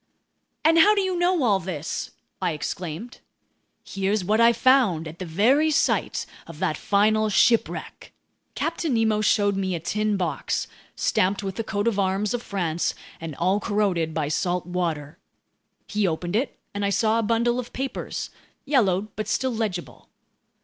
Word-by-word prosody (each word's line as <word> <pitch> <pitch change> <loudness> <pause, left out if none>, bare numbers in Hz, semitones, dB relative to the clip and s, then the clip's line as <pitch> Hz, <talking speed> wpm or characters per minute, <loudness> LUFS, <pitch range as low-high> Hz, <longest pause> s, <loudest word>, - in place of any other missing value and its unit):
"And 325 +1 +6
how 420 +6 +7
do 400 - +2
you 375 -1 -1
know 350 -3 +2
all 205 -5 +3
this?" 165 -4 -4 0.3
I 170 - 0
exclaimed. 175 +8 -5 0.6
"Here's 195 0 -1
what 215 +4 +2
I 230 0 +7
found 235 -10 +3
at 155 +2 -10
the 185 - -5
very 250 - +3
site 295 - +1 0.2
of - - -10
that - - 0
final 215 +2 +2
shipwreck!" 230 +3 +1 0.4
Captain 325 -4 -1
Nemo 220 -2 +2
showed 205 -1 +2
me 190 -2 -1
a - - -3
tin 210 +5 -1
box, 170 -6 -1 0.3
stamped 195 +2 +1
with 195 -1 -3
the 225 - -3
coat 205 0 -2
of 210 -3 +1
arms 195 +2 0
of 245 - -2
France 175 -6 -2 0.2
and 165 -3 -6
all 185 +6 +1
corroded 195 -7 0
by 155 -2 -1
salt 175 +3 -1
water. 165 -5 -3 0.7
He 210 -1 0
opened 175 +2 -2
it 250 +4 -1 0.2
and 205 0 -3
I 200 - +2
saw 220 +3 +2
a - - 0
bundle 235 +3 +1
of 245 - -6
papers, 265 0 -4 0.3
yellowed 210 -8 +1
but 215 - -4
still 260 -1 0
legible. 210 -6 -4
205 Hz, 165 wpm, -24 LUFS, 180-230 Hz, 0.7 s, how